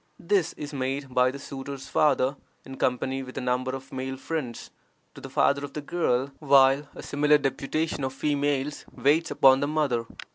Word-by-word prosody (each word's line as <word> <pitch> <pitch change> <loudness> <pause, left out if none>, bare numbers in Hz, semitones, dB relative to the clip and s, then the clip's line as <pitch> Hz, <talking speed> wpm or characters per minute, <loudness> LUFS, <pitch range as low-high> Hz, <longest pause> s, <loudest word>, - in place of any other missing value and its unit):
This 185 -1 +1
is 150 0 -7
made 135 0 -3
by 125 0 +4
the 135 - -6
suitor's 135 0 -7
father, 140 -2 +2 0.3
in 135 0 -9
company 130 +1 0
with 130 0 -9
a - - -2
number 125 +1 -1
of 135 +1 -10
male 130 0 -4
friends, 135 -5 -5 0.4
to - - -12
the - - -8
father 140 0 +2
of 140 -1 -7
the 150 - -4
girl, 140 -4 0
while 140 -1 +5
a - - -9
similar 150 +1 +3
deputation 145 +2 -2
of 130 - -1
females 145 0 -1
waits 155 +4 +2
upon 135 0 +5
the 145 - 0
mother. 140 -7 0
135 Hz, 180 wpm, -26 LUFS, 130-145 Hz, 0.4 s, while